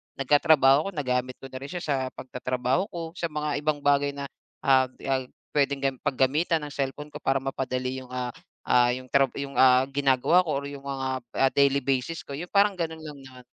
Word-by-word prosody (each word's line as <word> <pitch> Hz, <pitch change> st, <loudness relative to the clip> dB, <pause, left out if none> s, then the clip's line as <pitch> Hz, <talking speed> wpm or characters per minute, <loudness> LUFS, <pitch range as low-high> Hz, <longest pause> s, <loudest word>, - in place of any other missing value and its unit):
nagkatrabaho 145 Hz, +1 st, +4 dB
ako. -, -, -1 dB
Nagamit 125 Hz, -3 st, -1 dB
ko 135 Hz, -, -9 dB
na 130 Hz, -, -6 dB
rin 135 Hz, -, -7 dB
siya 175 Hz, -1 st, -5 dB
sa 145 Hz, -, 0 dB, 0.2 s
pagtatrabaho 130 Hz, +5 st, -2 dB
ko, 170 Hz, -, -6 dB, 0.2 s
sa 170 Hz, -, -1 dB
mga 150 Hz, -2 st, -2 dB
ibang 150 Hz, -1 st, -1 dB
bagay 145 Hz, 0 st, +2 dB
na, 140 Hz, -, -5 dB, 0.4 s
ah, 130 Hz, -1 st, +4 dB, 0.2 s
ah, 135 Hz, -2 st, -1 dB, 0.2 s
pwedeng 140 Hz, -1 st, +1 dB
gam 135 Hz, -1 st, +1 dB
paggamitan 150 Hz, +4 st, +1 dB
ng 145 Hz, -, -6 dB
cellphone 145 Hz, +2 st, -4 dB
ko 150 Hz, -, -8 dB
para 135 Hz, -2 st, +1 dB
mapadali 130 Hz, -1 st, -3 dB
yung, 130 Hz, -, -13 dB
ah, 125 Hz, -1 st, -3 dB, 0.4 s
ah, 120 Hz, 0 st, +4 dB
yung 130 Hz, +1 st, -7 dB
trab 135 Hz, -2 st, +3 dB, 0.3 s
ah, 130 Hz, 0 st, +6 dB
ginagawa 140 Hz, +5 st, +3 dB
ko 170 Hz, -, -7 dB
or -, -, -6 dB
yung 140 Hz, -1 st, -9 dB
mga, 135 Hz, -1 st, -3 dB, 0.4 s
ah, 135 Hz, -, +4 dB
daily 140 Hz, 0 st, +3 dB
basis 135 Hz, +5 st, -1 dB
ko, 140 Hz, -, -7 dB
yun 175 Hz, +4 st, -6 dB
parang 200 Hz, 0 st, +4 dB
ganun 160 Hz, -2 st, -3 dB
lang 150 Hz, -2 st, -9 dB
naman. 130 Hz, -1 st, -13 dB
140 Hz, 200 wpm, -26 LUFS, 130-150 Hz, 0.4 s, ah